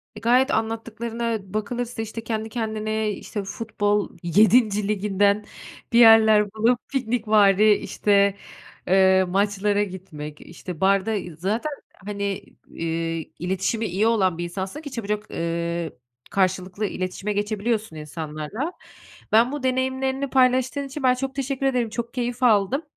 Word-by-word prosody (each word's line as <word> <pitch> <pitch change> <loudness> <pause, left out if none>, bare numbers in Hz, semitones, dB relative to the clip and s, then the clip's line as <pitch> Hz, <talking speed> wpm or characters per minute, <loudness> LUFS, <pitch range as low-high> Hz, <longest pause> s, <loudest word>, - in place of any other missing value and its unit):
E, 210 - -8
gayet 250 +5 +3
anlattıklarına 225 -2 -3
bakılırsa 235 +2 -3
işte 225 +1 -6
kendi 220 -1 -3
kendine, 220 -2 -2
işte 205 +1 -5
futbol 205 0 -1
7'nci 210 +3 +4
liginden 205 0 +1 0.5
bir 235 - +6
yerler 220 -2 +7
bulup 230 +3 +2
piknikvari, 215 -5 +3
işte, 200 -1 +2 0.5
eee, 190 0 +5
maçlara 205 +2 +1
gitmek, 160 -6 -8
işte 175 0 -9
barda 195 +3 +3 0.2
Zaten 220 - -1 0.3
hani, 200 -1 -3 0.3
iii, 165 -1 -3
iletişimi 190 +5 -1
iyi 200 +5 +1
olan 190 -7 +2
bir 175 - -3
insansın 190 - -5
ki 285 -3 -8
çabucak, 210 -2 -4
ııı, 170 0 -2 0.4
karşılıklı 185 +1 0
iletişime 190 +2 -3
geçebiliyorsun 210 -2 -2
insanlarla. 155 - -5 0.6
Ben 230 +4 +5
bu 290 -2 -5
deneyimlerini 260 +1 0
paylaştığın 260 +1 +2
için 270 +1 -7
ben 255 -1 +5
çok 270 +2 -4
teşekkür 275 0 -2
ederim, 250 -4 +1
çok 235 +1 -5
keyif 245 0 -3
aldım. 230 +6 +3
215 Hz, 125 wpm, -23 LUFS, 190-235 Hz, 0.6 s, yerler